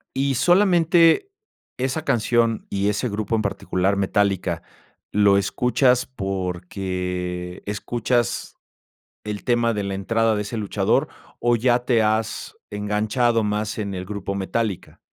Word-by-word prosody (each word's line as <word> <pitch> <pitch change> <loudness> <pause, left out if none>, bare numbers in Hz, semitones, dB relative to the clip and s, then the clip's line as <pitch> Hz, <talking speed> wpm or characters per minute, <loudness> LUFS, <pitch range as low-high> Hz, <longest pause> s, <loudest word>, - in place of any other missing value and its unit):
Y 135 0 +1
solamente, 175 - +4 0.5
esa 130 +4 -1
canción 115 -3 +1
y 100 +1 0
ese 105 +4 -1
grupo 105 +2 -2
en 110 - +1
particular, 95 -1 0
Metallica, 100 -1 0 0.5
¿lo 100 -1 +4
escuchas 125 +4 +2
porque 90 -3 -4
escuchas 120 +3 -1 0.7
el 105 -1 -5
tema 120 -1 +2
de 105 - -1
la 100 0 -3
entrada 110 +3 +1
de 105 - -1
ese 110 +3 -5
luchador, 105 -3 +1 0.3
o 120 0 +3
ya 120 +1 +2
te 120 -3 +3
has 110 +1 -1 0.2
enganchado 105 +3 +1
más 105 +1 -2
en 100 -2 -3
el 90 0 -4
grupo 100 0 -4
Metallica? 100 +1 -3
105 Hz, 125 wpm, -23 LUFS, 100-120 Hz, 0.7 s, solamente